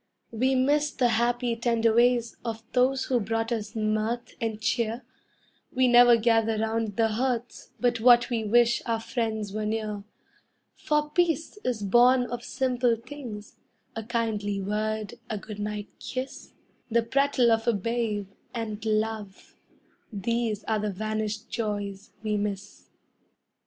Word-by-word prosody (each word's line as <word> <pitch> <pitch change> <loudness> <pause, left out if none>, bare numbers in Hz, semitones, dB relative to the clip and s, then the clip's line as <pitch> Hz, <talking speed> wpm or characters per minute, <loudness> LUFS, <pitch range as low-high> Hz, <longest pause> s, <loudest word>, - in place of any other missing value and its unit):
We 260 +4 +1
miss 290 +3 +2
the 250 -4 +1
happy, 240 +1 +1
tender 230 -1 +2
ways 240 0 +3
of 225 -1 -4
those 260 +1 +2
who 250 -2 +1
brought 225 +2 -2
us 220 -1 -3
mirth 215 +2 -1
and 220 -2 -2
cheer; 230 +1 -1 0.7
We 255 0 +3
never 240 -1 +7
gather 225 -1 +2
round 220 -1 -1
the 225 0 +2
hearth 240 +1 -2
but 245 -1 +1
what 240 +1 +6
we 230 -2 0
wish 240 +2 +3
our 230 -1 0
friends 225 -3 -3
were 215 0 -2
near; 215 -2 -3 0.7
For 300 0 -1
peace 340 +3 0
is 235 -4 -1
born 245 +5 +5
of 245 0 -5
simple 250 -2 +1
things 230 -3 -9 0.4
a 225 - -3
kindly 215 -3 -2
word, 215 +2 -2
a 215 - -2
good 210 +1 -8
night 210 0 -4
kiss, 260 +1 -6 0.4
The 230 0 +2
prattle 265 0 +2
of 225 +1 +1
a 235 - +4
babe, 215 -1 -1 0.3
and 220 -2 -4
love 215 -2 -2 0.6
these 220 +1 -1
are 220 -1 0
the 210 0 -1
vanished 215 +2 -3
joys 205 -3 -3
we 210 -1 0
miss. 200 -1 -5
225 Hz, 140 wpm, -27 LUFS, 215-240 Hz, 0.7 s, never